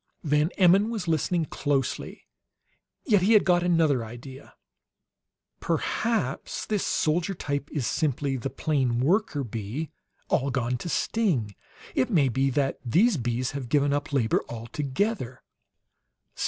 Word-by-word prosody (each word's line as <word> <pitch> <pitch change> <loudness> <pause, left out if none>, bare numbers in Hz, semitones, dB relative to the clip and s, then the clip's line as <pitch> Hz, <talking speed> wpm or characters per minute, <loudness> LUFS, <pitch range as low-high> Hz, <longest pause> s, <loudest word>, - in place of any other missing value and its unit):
Van 150 0 +2
Emmon 195 +3 +5
was 215 -6 -4
listening 165 +1 +1
closely, 140 -4 -2 0.8
yet 210 -8 +4
he 205 +5 +4
had 210 - +6
got 175 -1 +4
another 165 -8 +2
idea: 120 +4 -11 1.0
"Perhaps 180 - -1
this 210 -3 -1
soldier 165 +4 0
type 145 -2 -3
is 145 -6 -2
simply 140 -2 0
the 130 +1 -3
plain 130 -3 0
worker 155 - +1
bee, 115 +7 -5 0.4
all 135 +1 +1
gone 125 -2 -1
to 175 - -5
sting! 155 - 0 0.4
It 130 - +1
may 145 -8 +3
be 135 +3 +1
that 135 +1 0
these 185 - +3
bees 120 0 -1
have 140 -4 -6
given 145 +1 +2
up 145 0 -2
labor 125 -6 +1
altogether!" 130 - -3
145 Hz, 130 wpm, -26 LUFS, 130-175 Hz, 1.0 s, had